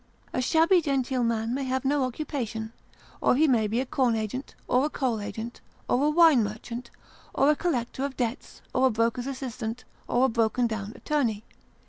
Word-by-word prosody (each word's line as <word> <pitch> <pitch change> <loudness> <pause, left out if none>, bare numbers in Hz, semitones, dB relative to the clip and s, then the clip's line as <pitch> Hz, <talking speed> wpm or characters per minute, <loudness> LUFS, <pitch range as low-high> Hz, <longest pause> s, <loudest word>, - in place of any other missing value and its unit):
A - - 0
shabby 330 +7 +4
genteel 265 -4 0
man 230 0 0
may 275 +1 -1
have 260 +1 -1
no 280 0 +2
occupation, 235 -5 -4 0.5
or - - +4
he 310 +4 +4
may 230 -6 +3
be 225 +3 0
a 260 - 0
corn 250 -3 +1
agent, 220 +5 -4
or 255 +3 +3
a - - 0
coal 250 -7 -1
agent, 225 +3 -6 0.3
or 275 +4 +2
a - - +4
wine 310 -6 +6
merchant, 235 +3 -6 0.5
or 280 +2 +5
a - - +2
collector 260 -6 -2
of 280 -1 -3
debts, 245 +2 -4
or 260 +1 +4
a - - +3
broker's 230 +2 0
assistant, 250 -3 -5 0.2
or 245 +2 +3
a - - +2
broken 230 +1 +1
down 215 -3 -3
attorney. 235 -8 -1
250 Hz, 185 wpm, -27 LUFS, 230-275 Hz, 0.5 s, wine